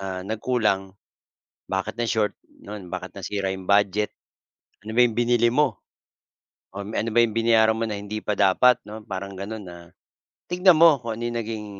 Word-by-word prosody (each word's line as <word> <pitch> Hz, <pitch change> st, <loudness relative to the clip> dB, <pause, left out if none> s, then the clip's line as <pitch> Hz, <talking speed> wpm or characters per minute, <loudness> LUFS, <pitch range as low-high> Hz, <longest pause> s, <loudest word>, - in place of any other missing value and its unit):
ah, 95 Hz, -1 st, -4 dB
nagkulang, 105 Hz, -3 st, -1 dB, 0.8 s
bakit 95 Hz, +4 st, -2 dB
na-short 110 Hz, -2 st, 0 dB
nun, 100 Hz, -3 st, -10 dB
bakit -, -, -5 dB
nasira 100 Hz, -2 st, -3 dB
'yong 95 Hz, -1 st, -8 dB
budget, 100 Hz, +1 st, +2 dB, 0.7 s
ano 110 Hz, -, -7 dB
ba -, -, +5 dB
'yong 115 Hz, -2 st, -1 dB
binili 120 Hz, -1 st, +3 dB
mo? 130 Hz, -6 st, +1 dB, 0.9 s
Oh, 100 Hz, +1 st, -6 dB
me 110 Hz, -, -6 dB
ano 115 Hz, -, -2 dB
ba 120 Hz, -, +4 dB
'yong 110 Hz, -, -3 dB
binayaran 115 Hz, -1 st, +4 dB
mo 115 Hz, -, -1 dB
na 105 Hz, -, -3 dB
hindi 105 Hz, +1 st, -5 dB
pa 105 Hz, -, 0 dB
dapat 120 Hz, +6 st, +4 dB
'no 110 Hz, +1 st, -9 dB
parang 95 Hz, 0 st, -6 dB
gano'n 105 Hz, +2 st, -6 dB
na 85 Hz, -1 st, -9 dB, 0.7 s
tignan 180 Hz, -1 st, +5 dB
mo 165 Hz, -2 st, +8 dB
kung 115 Hz, -1 st, -4 dB
ano -, -, -5 dB
yung 120 Hz, 0 st, -3 dB
naging 110 Hz, -1 st, -5 dB
110 Hz, 180 wpm, -24 LUFS, 100-115 Hz, 0.9 s, mo